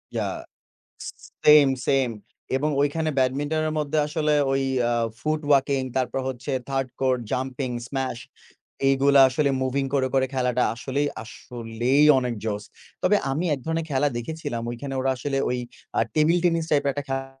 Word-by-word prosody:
Yeah -, -, -1 dB, 1.1 s
same, 150 Hz, -1 st, +8 dB, 0.2 s
same 135 Hz, -2 st, +2 dB, 0.5 s
এবং 150 Hz, +3 st, 0 dB
ঐখানে 155 Hz, +2 st, 0 dB
ব্যাডমিন্টনের 145 Hz, +4 st, 0 dB
মধ্যে 150 Hz, +1 st, -1 dB
আসলে 150 Hz, 0 st, 0 dB, 0.2 s
ওই 135 Hz, 0 st, +1 dB, 0.3 s
আ -, -, +1 dB, 0.3 s
ফুট 155 Hz, 0 st, -1 dB
ওয়াকিং 140 Hz, -1 st, +3 dB
তারপর 130 Hz, 0 st, 0 dB
হচ্ছে 130 Hz, +2 st, -5 dB, 0.2 s
থার্ড 135 Hz, -1 st, -1 dB
কোর, 130 Hz, -1 st, +3 dB, 0.2 s
জাম্পিং, 130 Hz, 0 st, -2 dB, 0.2 s
স্মাশ 130 Hz, -3 st, -3 dB, 0.7 s
এগুলা 140 Hz, +1 st, +5 dB
আসলে 140 Hz, +2 st, +1 dB
মুভিং 135 Hz, +1 st, 0 dB
করে, 130 Hz, -2 st, +2 dB
করে 130 Hz, 0 st, +3 dB
খেলাটা 125 Hz, -1 st, +1 dB
আসলেই, 140 Hz, +4 st, -2 dB, 0.2 s
আসলেই 120 Hz, +4 st, -1 dB
অনেক 125 Hz, -2 st, -2 dB
জোস। 105 Hz, -1 st, -3 dB, 0.4 s
তবে -, -, +4 dB
আমি 155 Hz, +6 st, -1 dB
১ 135 Hz, -, -7 dB
ধরনের 160 Hz, 0 st, -1 dB
খেলা 140 Hz, +2 st, +2 dB
দেখেছিলাম 145 Hz, -3 st, -5 dB
ঐখানে 135 Hz, +3 st, -5 dB
ওরা 135 Hz, +1 st, +1 dB
আসলে 135 Hz, +2 st, -2 dB
ওই 125 Hz, -, -1 dB, 0.4 s
আ -, -, +4 dB
টেবিল 160 Hz, +3 st, +3 dB
টেনিস 165 Hz, -2 st, +2 dB
টাইপের 140 Hz, -2 st, +2 dB
১ 145 Hz, -, -6 dB
টা -, -, -8 dB
খে 135 Hz, 0 st, -2 dB
135 Hz, 155 wpm, -24 LUFS, 130-150 Hz, 1.1 s, same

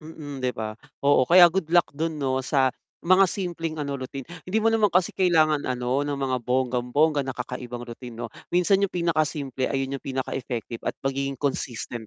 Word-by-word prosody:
Mm, 155 Hz, -3 st, -8 dB
'di 130 Hz, -1 st, +1 dB
ba? 110 Hz, -1 st, -3 dB, 0.3 s
Oo, 140 Hz, -2 st, +5 dB
kaya 175 Hz, 0 st, +8 dB
good 185 Hz, -3 st, -1 dB
luck 175 Hz, 0 st, +3 dB
dun 160 Hz, +2 st, -2 dB
'no 130 Hz, -2 st, 0 dB
sa 130 Hz, 0 st, +2 dB, 0.3 s
mga 185 Hz, +2 st, +5 dB
simpleng 170 Hz, -4 st, -3 dB
ano, 140 Hz, -1 st, -3 dB
routine. 130 Hz, +1 st, -6 dB, 0.2 s
Hindi 215 Hz, +4 st, 0 dB
mo 225 Hz, -, +4 dB
naman 225 Hz, -1 st, +4 dB
kasi 180 Hz, -1 st, +2 dB
kailangan 155 Hz, -5 st, +2 dB
ano, 125 Hz, +3 st, -1 dB
ng 145 Hz, -, -1 dB
mga 135 Hz, -2 st, -1 dB
bonggang-bongga 130 Hz, +4 st, +1 dB
na 130 Hz, -, -3 dB
kakaibang 125 Hz, -1 st, -6 dB
routine 120 Hz, 0 st, -9 dB
'no. 115 Hz, -1 st, -5 dB, 0.2 s
Minsan 185 Hz, +2 st, +4 dB
yung 200 Hz, -2 st, 0 dB
pinakasimple, 155 Hz, -6 st, 0 dB
ayun 135 Hz, 0 st, -2 dB
yung -, -, -34 dB
pinaka 130 Hz, -1 st, -3 dB
effective 120 Hz, -2 st, -5 dB
at -, -, -1 dB
magiging 135 Hz, 0 st, -1 dB
consistent 120 Hz, -4 st, -3 dB
140 Hz, 185 wpm, -25 LUFS, 130-165 Hz, 0.3 s, kaya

